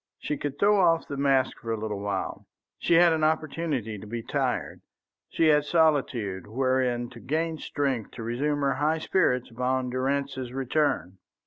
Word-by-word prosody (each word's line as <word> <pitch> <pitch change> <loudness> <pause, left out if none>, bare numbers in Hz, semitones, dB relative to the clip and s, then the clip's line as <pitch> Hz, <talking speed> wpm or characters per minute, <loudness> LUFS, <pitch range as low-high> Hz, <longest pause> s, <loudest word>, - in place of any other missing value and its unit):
She 150 - -3
could 145 0 -4
throw 205 0 +4
off 165 -2 +3
the 140 - -5
mask 135 -2 +1
for 115 - -5
a 115 - 0
little 105 -2 -3
while; 100 0 -4 0.3
she 170 - +2
had 170 0 +6
an 160 -1 0
opportunity 155 -8 -1
to 105 - -10
be 115 +1 -5
tired; - - -2 0.5
she 165 - +1
had 150 -1 +4
solitude 135 - +1
wherein 125 0 0
to 120 - -11
gain 160 +4 -2
strength 135 -6 -2
to 115 - -7
resume 145 +6 -1
her 140 -1 +2
high 150 +4 +1
spirits 125 -8 +1
upon 125 +1 -1
Durrance's 130 -1 -2
return. 130 - 0
135 Hz, 165 wpm, -27 LUFS, 120-155 Hz, 0.5 s, had